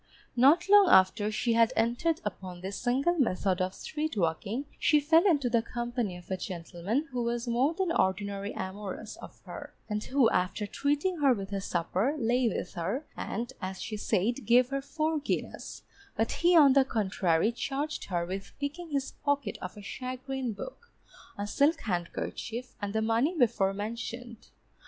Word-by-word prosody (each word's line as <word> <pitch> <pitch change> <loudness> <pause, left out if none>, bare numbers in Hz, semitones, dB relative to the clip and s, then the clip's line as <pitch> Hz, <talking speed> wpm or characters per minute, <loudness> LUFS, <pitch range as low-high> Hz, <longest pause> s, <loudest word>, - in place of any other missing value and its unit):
Not 285 +9 +5
long 405 -2 +7
after 205 +3 +5
she 230 +2 0
had 230 0 +4
entered 245 +9 +1
upon 180 -2 -6
this 190 +2 -5
single 275 +8 +1
method 190 -6 +1
of 185 +1 -1
street 310 -5 -4
walking, 200 - -1
she 300 - +4
fell 320 +6 +4
into 290 -8 +3
the 235 -1 +2
company 240 -5 -3
of 180 +1 -13
a 190 - 0
gentleman 185 - -3
who 250 -1 -2
was 235 +1 -2
more 255 +7 +2
than 375 -2 0
ordinary 200 - 0
amorous 190 0 -5
of - - -12
her, - - -9
and 210 -1 -2
who 265 -3 +3
after 185 +3 0
treating 290 - 0
her 275 -3 +5
with 200 -3 -5
a 195 - -1
supper, 190 - 0
lay 245 -1 +2
with 180 - -4
her, 195 - -2
and 240 +4 -4
(as 190 -1 -4
she 215 +3 -4
said) 220 +5 0
gave 245 +1 +5
her 275 0 -2
four 310 +3 -1
guineas; 285 - -4 0.3
but 225 - 0
he 345 0 +4
on 285 -4 +8
the 275 0 +6
contrary 195 -5 +1
charged 285 +5 -3
her 175 -3 -1
with 195 +2 -6
picking 305 +4 -4
his 275 -2 -2
pocket 285 -1 -1
of 185 +2 -7
a 205 - -9
shagreen 255 +2 -4
book, 470 - -9 0.5
a 205 - -2
silk 285 +10 +2
handkerchief, 220 +5 -4
and 205 0 -3
the 220 0 +1
money 235 +10 +1
before 210 -7 +3
mentioned. 230 +3 -6
235 Hz, 170 wpm, -29 LUFS, 195-280 Hz, 0.5 s, on